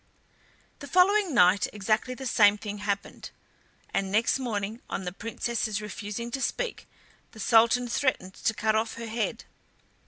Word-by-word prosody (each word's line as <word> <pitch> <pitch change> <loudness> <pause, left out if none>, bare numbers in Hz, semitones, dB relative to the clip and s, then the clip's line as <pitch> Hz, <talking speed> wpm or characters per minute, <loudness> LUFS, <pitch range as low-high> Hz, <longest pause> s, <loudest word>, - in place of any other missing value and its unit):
The 285 - -8
following 375 +4 +4
night 185 -5 +4
exactly 215 +5 -1
the 265 - -8
same 210 -4 +5
thing 205 -1 -6
happened, 200 -1 -4 0.6
and 195 -1 -1
next 225 +5 +2
morning, 220 -2 -3
on - - -3
the 180 - -3
Princess's 225 +1 -3
refusing 210 +2 -6
to 270 - -3
speak, - - -3 0.5
the 220 - -13
Sultan 235 +3 +4
threatened 230 -7 -1
to 225 - -1
cut 220 0 +1
off 220 +1 0
her 230 - -6
head. 225 0 -3
225 Hz, 150 wpm, -27 LUFS, 205-245 Hz, 0.6 s, same